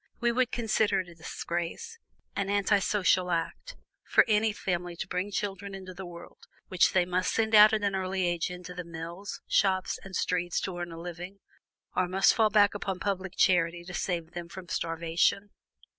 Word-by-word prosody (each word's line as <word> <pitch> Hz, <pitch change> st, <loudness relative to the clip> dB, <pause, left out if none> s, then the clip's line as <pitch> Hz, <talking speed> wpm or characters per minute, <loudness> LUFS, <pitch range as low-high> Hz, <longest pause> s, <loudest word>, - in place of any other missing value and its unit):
We 240 Hz, 0 st, +2 dB
would 255 Hz, +1 st, +1 dB
consider 220 Hz, -4 st, +1 dB
it 180 Hz, -, -11 dB
a -, -, -12 dB
disgrace, 170 Hz, -, -5 dB, 0.4 s
an 200 Hz, -1 st, -1 dB
anti 205 Hz, 0 st, +3 dB
social 185 Hz, -2 st, +2 dB
act, 170 Hz, -, -3 dB, 0.3 s
for -, -, +6 dB
any 215 Hz, 0 st, +3 dB
family 175 Hz, -3 st, -3 dB
to -, -, -5 dB
bring 180 Hz, +3 st, -2 dB
children 200 Hz, 0 st, -4 dB
into 185 Hz, -1 st, -8 dB
the 185 Hz, 0 st, -8 dB
world 170 Hz, 0 st, -12 dB, 0.2 s
which 185 Hz, -2 st, +3 dB
they 180 Hz, -2 st, +3 dB
must 180 Hz, +1 st, 0 dB
send 220 Hz, 0 st, 0 dB
out 210 Hz, +1 st, +9 dB
at 215 Hz, -1 st, 0 dB
an 200 Hz, -1 st, +1 dB
early 190 Hz, -1 st, -1 dB
age 175 Hz, -1 st, 0 dB
into 180 Hz, 0 st, -8 dB
the 180 Hz, 0 st, -5 dB
mills, 170 Hz, +3 st, -7 dB
shops, 190 Hz, -2 st, +1 dB
and 195 Hz, -1 st, -8 dB
streets 175 Hz, -1 st, 0 dB
to 190 Hz, -, -4 dB
earn 175 Hz, -1 st, -4 dB
a 165 Hz, -, -8 dB
living, 175 Hz, +3 st, -7 dB, 0.6 s
or 185 Hz, -, +2 dB
must 190 Hz, +2 st, +4 dB
fall 220 Hz, -2 st, +3 dB
back 205 Hz, -1 st, +4 dB
upon 195 Hz, -2 st, -3 dB
public 190 Hz, -2 st, -2 dB
charity 170 Hz, -2 st, +3 dB
to 180 Hz, +1 st, -9 dB
save 170 Hz, -2 st, -2 dB
them 175 Hz, -1 st, -7 dB
from 180 Hz, -1 st, -10 dB
starvation. 170 Hz, +4 st, 0 dB
185 Hz, 190 wpm, -29 LUFS, 175-200 Hz, 0.6 s, out